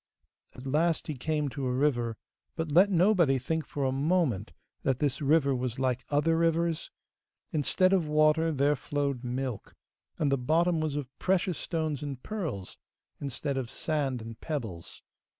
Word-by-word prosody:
At 125 Hz, -, -10 dB
last 160 Hz, +4 st, +1 dB
he 155 Hz, -, -3 dB
came 150 Hz, +3 st, -1 dB
to 135 Hz, 0 st, -3 dB
a -, -, 0 dB
river, 125 Hz, -4 st, +1 dB, 0.4 s
but 160 Hz, -2 st, -3 dB
let 185 Hz, +6 st, +6 dB
nobody 175 Hz, -6 st, +4 dB
think 160 Hz, +5 st, -2 dB
for 145 Hz, -, -3 dB
a 130 Hz, -, +2 dB
moment 135 Hz, -, +1 dB, 0.3 s
that 130 Hz, -2 st, +1 dB
this 140 Hz, 0 st, 0 dB
river 140 Hz, -1 st, +3 dB
was 125 Hz, -2 st, -2 dB
like 130 Hz, -2 st, 0 dB
other 150 Hz, +3 st, +2 dB
rivers? 165 Hz, 0 st, +1 dB, 0.6 s
Instead 185 Hz, +5 st, +3 dB
of 180 Hz, -5 st, +2 dB
water, 155 Hz, +2 st, +3 dB
there 145 Hz, 0 st, +2 dB
flowed 140 Hz, -2 st, -2 dB
milk, 125 Hz, -2 st, -4 dB, 0.4 s
and 145 Hz, -3 st, +1 dB
the 140 Hz, -, +2 dB
bottom 165 Hz, +5 st, +2 dB
was 155 Hz, -2 st, -1 dB
of 135 Hz, -2 st, -5 dB
precious 185 Hz, -2 st, +1 dB
stones 155 Hz, -5 st, -2 dB
and 140 Hz, -3 st, -5 dB
pearls, 160 Hz, -, -5 dB, 0.4 s
instead 140 Hz, 0 st, -3 dB
of 125 Hz, -3 st, -3 dB
sand 135 Hz, -6 st, -1 dB
and 115 Hz, 0 st, -9 dB
pebbles. 115 Hz, -, -5 dB
145 Hz, 160 wpm, -29 LUFS, 130-160 Hz, 0.6 s, let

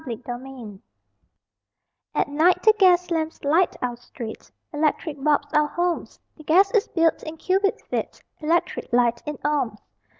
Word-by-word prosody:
LIGHT 235 Hz, 0 st, -6 dB
VERSE 245 Hz, -5 st, -8 dB, 1.4 s
At -, -, +1 dB
night 315 Hz, +5 st, +2 dB
the 435 Hz, -, +7 dB
gas 360 Hz, -2 st, +4 dB
lamps 320 Hz, -1 st, -2 dB
light 325 Hz, +6 st, +2 dB
our 245 Hz, -1 st, -1 dB
street, 235 Hz, -1 st, -9 dB, 0.2 s
Electric 295 Hz, -1 st, -1 dB
bulbs 290 Hz, -1 st, +1 dB
our 300 Hz, 0 st, +3 dB
homes; 350 Hz, +2 st, -2 dB, 0.2 s
The 310 Hz, -, -14 dB
gas 375 Hz, +6 st, +4 dB
is 435 Hz, -2 st, +2 dB
billed 330 Hz, -2 st, +1 dB
in 315 Hz, +1 st, -8 dB
cubic 390 Hz, +4 st, +1 dB
feet, -, -, -4 dB, 0.2 s
Electric 340 Hz, +3 st, -1 dB
light 240 Hz, -1 st, +2 dB
in 300 Hz, -1 st, -4 dB
ohms. 280 Hz, -8 st, 0 dB
305 Hz, 145 wpm, -23 LUFS, 260-345 Hz, 1.4 s, the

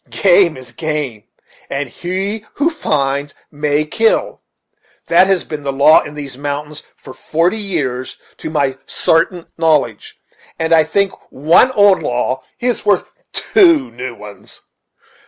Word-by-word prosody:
Game 180 Hz, -5 st, +3 dB
is 130 Hz, -2 st, -8 dB
game, 145 Hz, -9 st, -4 dB, 0.4 s
and 140 Hz, +1 st, -3 dB
he 190 Hz, -, -4 dB
who 310 Hz, +4 st, +1 dB
finds 140 Hz, -, -2 dB, 0.2 s
may 150 Hz, 0 st, 0 dB
kill; 455 Hz, -, 0 dB, 0.6 s
that 190 Hz, -, +4 dB
has 190 Hz, -3 st, +1 dB
been 150 Hz, -2 st, -6 dB
the 140 Hz, -1 st, -3 dB
law 145 Hz, +3 st, +5 dB
in 150 Hz, -, -9 dB
these 140 Hz, -3 st, -7 dB
mountains 145 Hz, +1 st, -4 dB, 0.2 s
for 130 Hz, -, -12 dB
forty 170 Hz, +10 st, 0 dB
years 140 Hz, -11 st, -3 dB, 0.2 s
to -, -, -6 dB
my 140 Hz, -4 st, -1 dB
sartain 165 Hz, +1 st, 0 dB
knowledge; 150 Hz, -10 st, 0 dB, 0.4 s
and 160 Hz, 0 st, 0 dB
I 160 Hz, -1 st, +5 dB
think 195 Hz, +5 st, +1 dB, 0.2 s
one 160 Hz, -, +4 dB
old 205 Hz, -3 st, +4 dB
law 125 Hz, +2 st, -2 dB, 0.2 s
is 245 Hz, -1 st, -1 dB
worth 205 Hz, -3 st, +1 dB, 0.2 s
two 335 Hz, -9 st, +3 dB
new 125 Hz, 0 st, -7 dB
ones. 105 Hz, -1 st, -11 dB
155 Hz, 140 wpm, -16 LUFS, 135-190 Hz, 0.6 s, law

